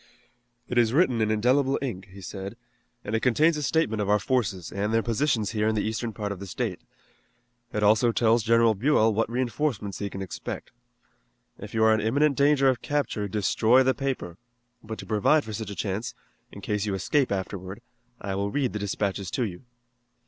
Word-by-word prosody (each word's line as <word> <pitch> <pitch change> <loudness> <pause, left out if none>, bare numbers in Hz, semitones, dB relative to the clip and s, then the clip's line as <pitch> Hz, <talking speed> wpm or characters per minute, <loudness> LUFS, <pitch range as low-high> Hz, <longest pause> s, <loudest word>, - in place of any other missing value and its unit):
"It 125 - +1
is 115 -1 +3
written 130 -7 +3
in 110 - +1
indelible 130 +6 +2
ink," 100 -9 -5
he 100 +1 -12
said, 95 +3 -7 0.5
"and 105 - -4
it 110 - +2
contains 150 +8 +3
a 150 - -3
statement 140 -8 +1
of 100 - -2
our 105 - +5
forces 105 -7 -1
and 100 +2 -2
their 115 0 +2
positions 120 -2 0
here 110 -1 0
in 110 - +1
the 105 - 0
eastern 110 +1 -2
part 105 -1 -4
of 100 - -5
the 100 - -7
state. - - -3 0.9
It 105 - -1
also 110 +3 +4
tells 115 0 +3
General 115 0 +4
Buell 115 0 +3
what 115 +1 0
reinforcements 120 -3 -2
he 100 - -3
can 95 0 -6
expect. 95 - -7 0.9
If 105 +2 -9
you 110 - +3
are 110 0 +6
in 110 - +1
imminent 140 +7 +2
danger 140 0 +4
of 130 -2 +2
capture 140 -8 -1
destroy 110 +5 +3
the 130 0 +3
paper, 130 - -4 0.4
but 110 0 -6
to - - -8
provide 115 +8 +3
for 110 - -7
such 110 -1 -5
a 100 - -6
chance, 105 +3 -3 0.4
in - - -10
case 105 0 -2
you 100 - -1
escape 135 +8 +1
afterward, 95 0 -4 0.4
I 100 -1 -4
will 100 +1 -1
read 130 +2 -1
the 105 - -3
dispatches 100 -1 -2
to 125 - -1
you." 95 +1 -6
110 Hz, 200 wpm, -26 LUFS, 100-125 Hz, 0.9 s, are